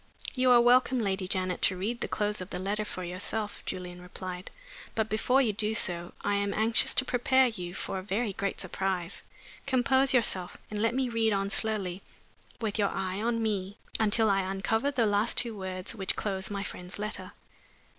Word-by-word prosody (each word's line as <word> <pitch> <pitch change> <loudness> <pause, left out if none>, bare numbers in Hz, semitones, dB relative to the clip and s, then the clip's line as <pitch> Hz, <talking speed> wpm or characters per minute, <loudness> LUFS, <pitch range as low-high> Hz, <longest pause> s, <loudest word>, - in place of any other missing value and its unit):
"You 255 -1 +2
are 245 -1 +8
welcome, 250 +2 +5
Lady 195 -3 -1
Janet, 185 -1 -1
to 185 - +2
read 225 +6 -2
the - - -1
close 210 -2 0
of 185 - -7
the - - -4
letter 205 +3 -2
for 185 - -6
yourself," 205 +4 -4
Julian 180 -1 -5
replied. 180 0 -7 0.5
"But 220 -1 0
before 250 +5 +3
you 220 -4 +1
do 215 +2 +1
so 175 -4 -1
I 205 0 +1
am 200 0 -1
anxious 220 +1 +3
to 260 - +4
prepare 255 +1 +3
you 180 -5 -6
for 190 - -3
a - - -5
very 205 +2 -1
great 200 +1 -2
surprise. 190 -2 -2 0.5
Compose 265 +1 +4
yourself 195 -8 +1
and 210 -1 -2
let 230 +2 +2
me 265 -1 +1
read 225 -2 +1
on 195 0 0
slowly, 195 -3 +1 0.6
with 220 -2 -2
your 200 -1 +3
eye 190 +1 -3
on 230 0 0
me, 200 -2 -2 0.2
until 220 +1 +3
I 195 -1 +3
uncover 195 +7 0
the 260 -5 +1
last 205 +2 +2
two 230 -2 +2
words 185 -1 -5
which 195 -4 -1
close 190 -2 -2
my 200 -1 -3
friend's 180 0 -5
letter." 210 +1 -5
205 Hz, 190 wpm, -29 LUFS, 190-230 Hz, 0.6 s, are